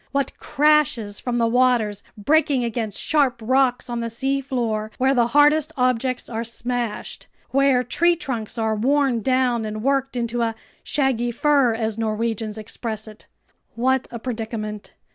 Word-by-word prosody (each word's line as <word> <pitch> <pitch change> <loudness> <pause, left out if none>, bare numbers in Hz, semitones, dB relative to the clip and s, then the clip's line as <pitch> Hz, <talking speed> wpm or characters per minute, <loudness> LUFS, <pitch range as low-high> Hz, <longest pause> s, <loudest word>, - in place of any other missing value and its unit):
What 280 0 -1
crashes 285 -8 +2
from 245 -1 -3
the 235 -1 +2
waters 230 -4 +2 0.2
breaking 280 +3 +2
against 225 -3 -3
sharp 275 -6 +1
rocks 255 +2 +1
on 240 -1 -3
the 230 0 -3
seafloor, 245 -3 -1
where 265 +1 +3
the 240 -3 +3
hardest 295 +4 +4
objects 255 0 0
are 230 -1 -3
smashed, 235 -1 -3 0.2
where 275 -2 +3
tree 345 +8 +2
trunks 240 -9 -4
are 220 -1 0
worn 260 +1 +1
down 255 -1 +1
and 215 0 -5
worked 270 0 0
into 240 0 -1
"a 225 -1 0 0.3
shaggy 265 -5 0
fur," 265 -1 +2
as 220 -1 -2
Norwegians 220 -1 -2
express 220 0 -5
it! 215 0 -13 0.5
What 260 +2 +1
a 235 - -6
predicament! 220 -3 -5
240 Hz, 145 wpm, -22 LUFS, 225-270 Hz, 0.5 s, hardest